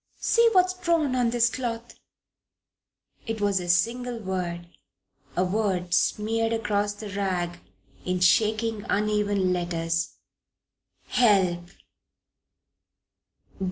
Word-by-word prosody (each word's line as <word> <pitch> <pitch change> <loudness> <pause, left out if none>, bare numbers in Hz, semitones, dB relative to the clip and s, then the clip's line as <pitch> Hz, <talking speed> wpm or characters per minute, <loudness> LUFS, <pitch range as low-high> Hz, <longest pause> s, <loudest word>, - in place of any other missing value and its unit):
See 465 0 +3
what's 370 -1 +4
drawn 335 -7 0
on 245 -2 +2
this 240 0 +3
cloth 235 -1 -4 0.7
" - - -42
It 225 -1 -3
was 200 -2 +1
a 175 -1 -6
single 235 +7 +1
word 180 -4 -4 0.7
a 180 - +3
word 185 -3 -1
smeared 225 +3 +1
across 205 -2 0
the 205 0 -8
rag 180 -3 -2 0.4
in 180 0 -1
shaking, 215 +3 +2
uneven 205 -2 +1
letters: 170 -1 -2 0.9
"HELP!" 185 -7 +2
205 Hz, 100 wpm, -26 LUFS, 180-230 Hz, 0.9 s, what's